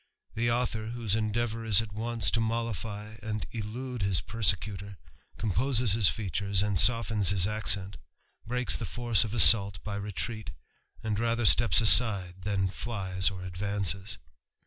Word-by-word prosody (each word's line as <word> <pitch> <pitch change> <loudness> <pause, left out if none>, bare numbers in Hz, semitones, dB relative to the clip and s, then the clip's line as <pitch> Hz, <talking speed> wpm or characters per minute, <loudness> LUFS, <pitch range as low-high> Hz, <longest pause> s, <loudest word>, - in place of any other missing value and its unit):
The 120 +2 -1
author, 115 -2 -2
whose 115 -3 -3
endeavour 110 +1 -2
is 110 -3 +3
at 110 -2 -4
once 115 +1 -2
to 115 - 0 0.8
and 110 -1 -4
elude 120 +2 -6
his 95 -3 +1
persecutor, 100 -2 -3 0.4
composes 115 +2 0
his 105 -4 +3
features 100 +1 -1
and 105 -4 -1
his 105 -4 +2
accent, 100 -2 -1 0.5
breaks 125 +2 -1
the 115 - -4
force 120 0 +1
of 115 0 -6
assault 100 -2 +6
by 100 -1 -5
retreat, 105 +1 -5 0.5
;her 115 +2 -1
steps 115 +2 +5
aside 100 -5 +5
than 95 -1 -1
flies 95 -3 -3
or 95 -2 -8
advances. 100 +1 -3
105 Hz, 130 wpm, -28 LUFS, 100-115 Hz, 0.8 s, assault